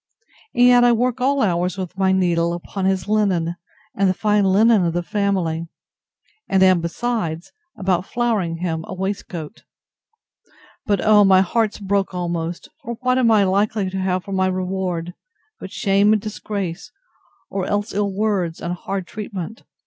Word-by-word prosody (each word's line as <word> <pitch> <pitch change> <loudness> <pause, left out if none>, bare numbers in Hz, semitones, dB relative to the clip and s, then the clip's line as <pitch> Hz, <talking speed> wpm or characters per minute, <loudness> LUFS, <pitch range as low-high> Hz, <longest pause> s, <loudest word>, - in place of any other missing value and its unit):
And 245 0 +5
yet 245 0 +6
I 240 0 +5
work 250 +2 0
all 275 +1 +2
hours 180 -1 0
with 185 -1 -5
my 190 0 +2
needle, 170 -2 +1
upon 185 +2 -4
his 190 0 0
linen, 190 -6 +1 0.4
and 195 -1 +2
the 185 - 0
fine 210 0 +2
linen 210 +2 +4
of 170 -1 0
the 175 0 -1
family; 175 -5 -1 0.8
and 190 0 +4
am, 185 -2 +5
besides, 170 -2 -3 0.3
about 185 -1 0
flowering 220 -9 -1
him 165 -2 -3
a 185 - -6
waistcoat.—But, 195 - -7
oh! 210 -1 +6
my 190 -1 +6
heart's 215 +3 0
broke 195 -1 -1
almost; 170 -1 -3
for 235 +1 -5
what 255 0 +2
am 240 -3 +3
I 215 -2 +5
likely 200 0 0
to 190 - -3
have 185 -1 -1
for 195 - -9
my 190 -1 +1
reward, 185 -2 -2 0.5
but - - -8
shame 200 +1 +3
and 215 - +2
disgrace, 200 -4 -5 0.6
or 195 -2 -2
else 205 +1 -1
ill 200 0 0
words, 195 -5 -1
and 175 - -3
hard 190 +1 -4
treatment! 210 +1 -7
190 Hz, 160 wpm, -21 LUFS, 180-210 Hz, 0.8 s, yet